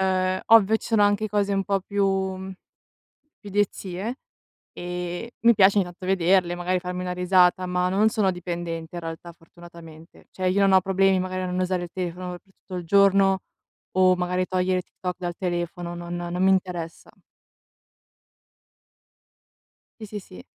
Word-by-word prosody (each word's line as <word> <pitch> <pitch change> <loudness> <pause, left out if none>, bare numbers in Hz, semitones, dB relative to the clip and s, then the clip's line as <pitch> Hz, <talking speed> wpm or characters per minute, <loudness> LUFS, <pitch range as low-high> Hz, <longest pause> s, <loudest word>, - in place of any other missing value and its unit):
Uhm, 185 0 +1
ovvio 220 -1 +6
ci - - -10
sono 225 -3 +3
anche 205 +1 +2
cose 205 -1 0
un 195 0 0
po' 195 -1 0
più 200 +1 0
mhmm 190 0 -2 0.9
più 205 - -13
idiozie, 200 +2 -2 0.6
e 180 +5 -5
mi 235 - +8
piace 195 +1 +5
ogni 195 - +3
tanto 175 +1 -10
vederle 185 -1 +2
magari 180 +1 -1
farmi 180 0 -4
una 180 0 -3
risata, 180 0 +3
ma 180 0 0
non 205 +4 +3
sono 210 -4 +1
dipendente 170 -2 -5
in 175 - -3
realtà, 165 +1 -7
fortunatamente. 165 -1 -15
Cioè, 185 -1 -1
io 195 - +1
non 195 -1 +4
ho 190 - +6
problemi 195 0 +2
magari 185 0 -3
a - - -2
non 180 0 -3
usare 185 -1 -1
il 175 - -7
telefono 180 0 -4
per 175 - -9
tutto 195 -1 -12
il 175 -1 -5
giorno 195 +1 +4 0.6
o 185 -1 +5
magari 180 +1 -1
togliere 185 0 0
Tik - - -34
Tok 180 -1 -3
dal 175 -1 -4
telefono. 175 -1 -3
Non 175 0 -6
non 175 +1 -3
mi 190 - +5
interessa. 180 -3 -2 2.9
Sì, 215 - -7
sì, 210 +1 -6
sì. 90 - -13
185 Hz, 170 wpm, -24 LUFS, 175-195 Hz, 2.9 s, mi